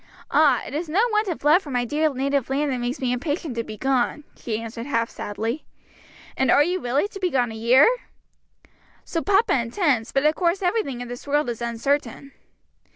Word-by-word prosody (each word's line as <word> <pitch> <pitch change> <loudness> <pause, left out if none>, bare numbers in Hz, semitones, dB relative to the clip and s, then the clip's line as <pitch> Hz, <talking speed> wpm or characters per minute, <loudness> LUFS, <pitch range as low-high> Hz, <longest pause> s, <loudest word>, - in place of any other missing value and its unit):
"Ah, 300 0 +4
it - - -8
is 315 +2 -3
no 345 +6 +1
want 425 0 +1
of 345 -6 -4
love 305 +6 +5
for 300 - -11
my 245 -2 0
dear 305 +5 +1
native 275 0 -1
land 280 +1 0
that 255 - -2
makes 245 +2 -3
me 250 -2 0
impatient 290 +3 -3
to 230 - -2
be 215 -1 -9
gone!" 265 +4 0
she 220 -2 -4
answered 230 +2 -7
half 230 -5 0
sadly. 225 +7 -4 0.7
"And 265 - +1
are 290 - +6
you 360 +4 -1
really 275 +6 0
to 395 - -9
be 365 -1 0
gone 245 -6 0
a - - -7
year?" 235 +5 +5 1.2
"So 330 - -2
papa 405 +2 +3
intends, 240 - 0
but 275 +2 +1
of 305 - +5
course 355 +3 0
everything 355 - -1
in 245 - -6
this 245 +3 -8
world 290 -3 +1
is 235 - -8
uncertain." 245 +3 -2
275 Hz, 205 wpm, -23 LUFS, 240-315 Hz, 1.2 s, are